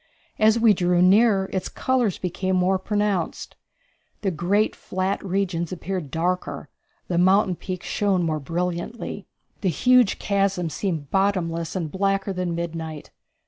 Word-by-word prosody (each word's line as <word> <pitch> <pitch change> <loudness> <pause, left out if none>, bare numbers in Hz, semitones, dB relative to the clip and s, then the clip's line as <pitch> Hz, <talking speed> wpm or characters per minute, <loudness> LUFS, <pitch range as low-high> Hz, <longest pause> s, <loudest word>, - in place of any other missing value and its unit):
As 220 +1 +4
we 225 -2 +6
drew 180 -1 +1
nearer 195 +1 +4
its 190 - -2
colors 250 -7 0
became 185 +1 -2
more 185 +1 +2
pronounced; 205 -2 -2 0.7
the 195 - 0
great 190 +6 +1
flat 185 +1 -2
regions 185 -3 -1
appeared 180 -3 -4
darker; 175 +5 -2 0.4
the 175 -1 0
mountain 185 +1 +4
peaks 185 0 -6
shone 195 -4 +1
more 155 -2 -1
brilliantly. 175 +7 -4 0.3
The 195 - +1
huge 245 - +4
chasms 195 -5 0
seemed 160 -7 -3
bottomless 175 -4 0
and 165 -5 -3
blacker 195 0 0
than 180 -2 -2
midnight. 165 -2 -5
185 Hz, 135 wpm, -24 LUFS, 170-200 Hz, 0.7 s, we